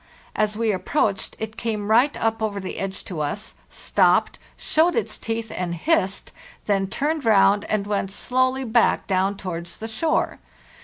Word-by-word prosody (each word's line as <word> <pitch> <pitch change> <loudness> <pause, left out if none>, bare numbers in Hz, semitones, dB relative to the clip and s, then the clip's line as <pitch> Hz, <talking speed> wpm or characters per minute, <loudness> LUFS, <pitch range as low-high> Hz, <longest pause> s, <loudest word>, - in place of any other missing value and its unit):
As 215 0 0
we 225 -1 +1
approached, 200 +1 -1
it 220 0 -6
came 215 -3 -2
right 250 +6 +4
up 225 0 0
over 210 -2 -1
the 190 - -6
edge 195 0 -4
to 175 -5 -6
us, 200 +9 -4 0.2
stopped, - - +2 0.2
showed 330 +3 +2
its 460 - -1
teeth, 225 0 -4
and 175 -2 -2
hissed, 195 - 0 0.3
then 195 -2 +1
turned 295 +8 -1
round 200 -2 +4
and 210 -2 -1
went 200 -2 -1
slow 255 +5 +1
ly 265 +1 -4
back 235 -1 +2
down 195 +1 +1
towards 170 -2 -5
the 225 - -6
shore. 310 +8 0
215 Hz, 165 wpm, -23 LUFS, 195-230 Hz, 0.3 s, right